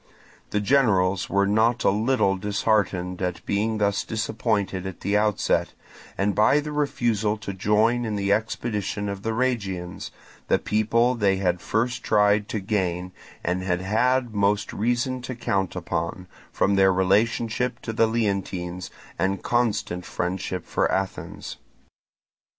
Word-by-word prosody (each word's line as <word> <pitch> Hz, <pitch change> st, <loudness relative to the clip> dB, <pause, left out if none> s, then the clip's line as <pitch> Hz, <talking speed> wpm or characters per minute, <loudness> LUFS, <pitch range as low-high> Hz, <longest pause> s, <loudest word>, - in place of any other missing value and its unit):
The 105 Hz, -, 0 dB
generals 100 Hz, -7 st, +2 dB
were 100 Hz, 0 st, +2 dB
not 110 Hz, +4 st, +2 dB
a -, -, +4 dB
little 110 Hz, -1 st, +2 dB
disheartened 100 Hz, -2 st, 0 dB
at 90 Hz, -1 st, -3 dB
being 110 Hz, +2 st, 0 dB
thus 100 Hz, -1 st, +1 dB
disappointed 105 Hz, -4 st, -1 dB
at 95 Hz, -, -8 dB
the 100 Hz, -, 0 dB
outset, 105 Hz, -1 st, +1 dB, 0.4 s
and 100 Hz, +1 st, +1 dB
by 110 Hz, +8 st, +4 dB
the 150 Hz, +1 st, -5 dB
refusal 115 Hz, -8 st, 0 dB
to 100 Hz, -2 st, -6 dB
join 105 Hz, +5 st, +2 dB
in 110 Hz, -2 st, -2 dB
the 100 Hz, 0 st, +1 dB
expedition 105 Hz, -1 st, -2 dB
of 100 Hz, -1 st, -4 dB
the 115 Hz, -, -2 dB
Rhegians, 100 Hz, -8 st, -2 dB, 0.4 s
the -, -, +4 dB
people 115 Hz, +3 st, +2 dB
they 100 Hz, -5 st, +2 dB
had 90 Hz, -2 st, 0 dB
first 120 Hz, +3 st, -1 dB
tried 105 Hz, 0 st, +3 dB
to 110 Hz, -, -2 dB
gain 90 Hz, -3 st, -1 dB, 0.3 s
and 90 Hz, +2 st, -1 dB
had 90 Hz, -1 st, -1 dB
had 125 Hz, +7 st, +2 dB
had 120 Hz, -3 st, -12 dB
most 100 Hz, 0 st, +1 dB
reason 120 Hz, +3 st, 0 dB
to 125 Hz, +1 st, -5 dB
count 95 Hz, -5 st, -1 dB
upon, 90 Hz, -, -3 dB, 0.3 s
from 100 Hz, 0 st, +1 dB
their 95 Hz, 0 st, +5 dB
relationship 110 Hz, +6 st, +1 dB
to 115 Hz, -, -4 dB
the 115 Hz, 0 st, +3 dB
Leontines 95 Hz, -5 st, -2 dB, 0.3 s
and 95 Hz, +1 st, 0 dB
constant 110 Hz, -7 st, 0 dB
friendship 90 Hz, 0 st, -3 dB
for -, -, 0 dB
Athens. 95 Hz, 0 st, -4 dB
105 Hz, 145 wpm, -24 LUFS, 95-115 Hz, 0.4 s, their